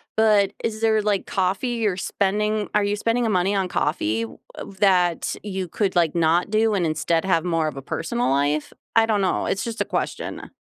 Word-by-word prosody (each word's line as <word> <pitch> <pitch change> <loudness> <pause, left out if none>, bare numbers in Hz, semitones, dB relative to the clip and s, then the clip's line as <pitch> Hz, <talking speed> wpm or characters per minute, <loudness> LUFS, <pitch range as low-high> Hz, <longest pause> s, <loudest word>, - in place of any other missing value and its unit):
but 210 -3 +4
is 220 -1 -2
there, 220 -1 +3
like, 205 -2 0
coffee 195 +6 -1
you're 220 -6 -1
spending 210 +2 0
are 210 - +4
you 205 +1 0
spending 230 +3 0
a 220 - +1
money 190 +2 +1
on 190 -2 0
coffee 115 -10 -1 0.3
of 195 - -9
that 180 -4 +2
you 190 -3 -4
could, 195 +2 -1
like, 170 -3 +3
not 170 +4 +2
do 215 0 +2
and 180 -4 +1
instead 165 +2 0
have 180 -3 +2
more 165 -3 0
of 140 -3 -5
a - - -5
personal 235 - -2
life? 145 +2 0 0.2
I 225 0 +5
don't 210 -3 +1
know, 185 - 0
it's 195 - -1
just 230 -1 -4
a - - +1
question, - - -4
195 Hz, 205 wpm, -23 LUFS, 170-215 Hz, 0.3 s, I